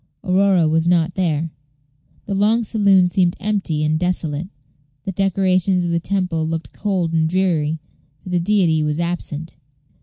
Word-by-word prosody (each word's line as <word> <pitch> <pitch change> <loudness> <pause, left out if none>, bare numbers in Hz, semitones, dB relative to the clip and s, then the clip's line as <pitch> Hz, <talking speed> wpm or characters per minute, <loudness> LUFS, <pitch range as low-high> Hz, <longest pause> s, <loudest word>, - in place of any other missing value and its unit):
Aurora 185 -2 +3
was 160 +1 +1
not 175 -1 +2
there. 165 -4 -1 0.7
The 200 - -4
long 215 +4 +2
saloon 200 -4 +3
seemed 180 0 +1
empty 195 -7 -1
and 155 +1 +1
desolate. 175 -2 -2 0.6
The 195 - -2
decorations 190 -1 +1
of 170 - -1
the 170 - +1
temple 180 -3 -1
looked 165 0 -4
cold 185 -5 -1
and 160 -1 +2
dreary, 165 -4 0 0.5
for - - -9
the 180 -1 +1
deity 175 -4 +2
was 150 +1 -1
absent. 165 -3 -4
175 Hz, 150 wpm, -20 LUFS, 160-195 Hz, 0.7 s, Aurora